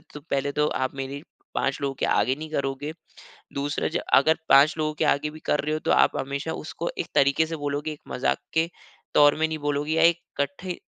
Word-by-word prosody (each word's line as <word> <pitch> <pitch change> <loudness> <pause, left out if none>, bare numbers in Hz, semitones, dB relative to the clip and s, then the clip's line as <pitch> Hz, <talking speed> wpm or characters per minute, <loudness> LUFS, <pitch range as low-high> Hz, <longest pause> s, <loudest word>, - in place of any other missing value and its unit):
तो 150 - -7
पहले 140 +1 0
तो 150 - +4 0.2
आप 130 - -1
मेरी 135 +1 -5 0.3
5 135 +1 0
लोगों 140 -1 -1
के - - -1
आगे 115 +6 +2
नहीं 155 +1 -7
करोगे, 140 +1 -2 0.6
दूसरा 140 +1 -1 0.3
अगर 160 +4 +4
5 140 +3 +7
लोगों 155 0 -1
के 155 - +3
आगे 145 +1 +2
भी 155 - -11
कर 150 - +2
रहे 150 +1 -1
हो 155 - -1
तो - - -1
आप - - +4
हमेशा 140 +4 -3
उसको 170 +2 -4
एक - - -2
तरीके 140 +3 +4
से 165 +1 -4
बोलोगे 145 +1 -3
एक 150 - -9
मज़ाक 125 - 0 0.2
के 160 +1 +3 0.5
तौर 145 0 +6
में 160 - +3
नहीं 160 - -3
बोलोगे 145 +1 -1
या 165 0 +3
एक 170 0 +4 0.2
कट्ठे 145 +6 -3
145 Hz, 215 wpm, -25 LUFS, 140-155 Hz, 0.6 s, 5